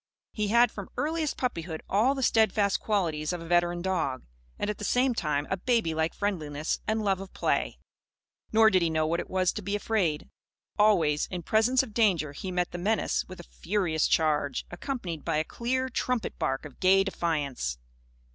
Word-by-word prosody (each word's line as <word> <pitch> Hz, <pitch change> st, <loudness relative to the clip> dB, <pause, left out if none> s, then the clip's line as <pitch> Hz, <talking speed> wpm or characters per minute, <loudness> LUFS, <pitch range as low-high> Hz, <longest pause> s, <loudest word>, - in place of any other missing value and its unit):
He 210 Hz, -1 st, -1 dB
had 235 Hz, +2 st, +4 dB
from 200 Hz, -2 st, -8 dB
earliest 310 Hz, 0 st, -1 dB
puppyhood, 165 Hz, -10 st, -3 dB
all 230 Hz, +8 st, +2 dB
the 265 Hz, -, -2 dB
steadfast 215 Hz, -3 st, +3 dB
qualities 165 Hz, -7 st, -1 dB
of 175 Hz, -, -3 dB
a 165 Hz, -, -8 dB
veteran 175 Hz, 0 st, +1 dB
dog; 165 Hz, -9 st, -1 dB, 0.3 s
and -, -, -2 dB
at 210 Hz, -1 st, -3 dB
the -, -, -6 dB
same 250 Hz, +4 st, +2 dB
time 150 Hz, -8 st, -1 dB
a 190 Hz, -, +1 dB
babylike 165 Hz, -8 st, 0 dB
friendliness 155 Hz, -7 st, -2 dB
and 220 Hz, 0 st, 0 dB
love 195 Hz, -2 st, +1 dB
of 195 Hz, -, -9 dB
play. -, -, 0 dB, 0.7 s
Nor 220 Hz, 0 st, +6 dB
did 185 Hz, -1 st, +3 dB
he 170 Hz, -, +2 dB
know 155 Hz, -1 st, +1 dB
what 170 Hz, +2 st, 0 dB
it -, -, -5 dB
was 185 Hz, -1 st, +2 dB
to 215 Hz, -, -5 dB
be 200 Hz, +1 st, -2 dB
afraid. 200 Hz, -8 st, 0 dB, 0.5 s
Always, 170 Hz, -9 st, +3 dB
in 180 Hz, -2 st, -5 dB
presence 230 Hz, +8 st, +3 dB
of 230 Hz, -5 st, -10 dB
danger, 180 Hz, -10 st, +2 dB
he 165 Hz, +6 st, -6 dB
met 180 Hz, -1 st, -1 dB
the 175 Hz, -, -5 dB
menace 215 Hz, +5 st, 0 dB
with 185 Hz, -1 st, -10 dB
a -, -, -8 dB
furious 175 Hz, -4 st, -1 dB
charge, 150 Hz, -3 st, +1 dB
accompanied 175 Hz, -, -5 dB
by 165 Hz, -2 st, 0 dB
a 155 Hz, -, +2 dB
clear, 260 Hz, +8 st, -2 dB
trumpet 250 Hz, -3 st, -2 dB
bark 135 Hz, +3 st, -1 dB
of 145 Hz, -, -12 dB
gay 195 Hz, +1 st, +5 dB
defiance. 145 Hz, -, -2 dB
185 Hz, 185 wpm, -28 LUFS, 160-220 Hz, 0.7 s, Nor